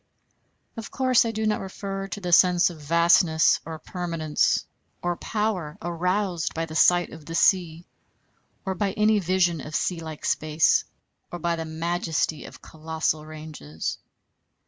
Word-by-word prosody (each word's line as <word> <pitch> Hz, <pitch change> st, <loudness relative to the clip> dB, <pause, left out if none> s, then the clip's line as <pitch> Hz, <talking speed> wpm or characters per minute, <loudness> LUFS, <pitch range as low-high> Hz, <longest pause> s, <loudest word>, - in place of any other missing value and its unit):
Of 225 Hz, -, -6 dB
course 255 Hz, -3 st, +3 dB
I 230 Hz, -, -1 dB
do 220 Hz, 0 st, -2 dB
not 215 Hz, 0 st, 0 dB
refer 195 Hz, 0 st, -5 dB
to 195 Hz, -, -6 dB
the 180 Hz, -3 st, -4 dB
sense 180 Hz, 0 st, +5 dB
of 160 Hz, -3 st, -12 dB
vastness 170 Hz, +1 st, +4 dB
or 160 Hz, -1 st, -6 dB
permanence 165 Hz, -2 st, -1 dB, 0.4 s
or 175 Hz, 0 st, 0 dB
power 195 Hz, -7 st, -2 dB
aroused 180 Hz, -1 st, -1 dB
by 165 Hz, 0 st, -1 dB
the 155 Hz, -, -10 dB
sight 175 Hz, +2 st, +4 dB
of 160 Hz, -1 st, -11 dB
the 165 Hz, -, -5 dB
sea, 170 Hz, -2 st, +2 dB, 0.8 s
or 190 Hz, -, -1 dB
by 195 Hz, +1 st, -1 dB
any 215 Hz, 0 st, +3 dB
vision 175 Hz, -3 st, +1 dB
of 150 Hz, +2 st, -7 dB
sea 180 Hz, -2 st, -1 dB
like 160 Hz, -2 st, -8 dB
space, 155 Hz, +1 st, +2 dB, 0.5 s
or 175 Hz, -, -4 dB
by 170 Hz, 0 st, -1 dB
the 165 Hz, -1 st, -5 dB
majesty 160 Hz, -1 st, -2 dB
of -, -, -13 dB
colossal 160 Hz, -1 st, -3 dB
ranges. 155 Hz, -, -6 dB
170 Hz, 150 wpm, -25 LUFS, 160-190 Hz, 0.8 s, sense